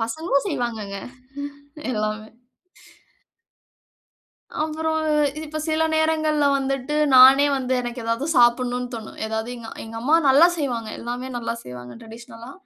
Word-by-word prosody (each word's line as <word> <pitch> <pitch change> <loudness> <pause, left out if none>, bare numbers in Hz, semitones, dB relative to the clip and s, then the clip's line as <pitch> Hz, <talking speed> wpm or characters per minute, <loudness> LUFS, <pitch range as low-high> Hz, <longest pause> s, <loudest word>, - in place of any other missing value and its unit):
பசங்களும் 280 +6 -1
செய்வாங்கங்க 225 - -3 0.9
எல்லாமே. 215 -1 -3 2.4
அப்புறம் 315 0 -1 0.5
இப்ப 310 0 -6
சில 315 0 +1
நேரங்கள்ல 310 -2 +2
வந்துட்டு 270 +1 -2 0.2
நானே 265 +3 +8
வந்து 260 -1 -2
எனக்கு 240 0 -5
ஏதாவது 230 +6 -1
சாப்பிடணும்னு 245 +1 +2
தோணும். 225 -2 -8
ஏதாவது 220 +1 -3
எங் 235 - -11 0.2
எங்க 225 0 -9
அம்மா 290 +7 +3
நல்லா 285 +6 +7
செய்வாங்க. 240 -6 -2
எல்லாமே 245 +2 -5
நல்லா 230 -1 -3
செய்வாங்க 125 0 -9
டிரடிஷனலா, 230 +1 -11
250 Hz, 115 wpm, -23 LUFS, 230-295 Hz, 2.4 s, நானே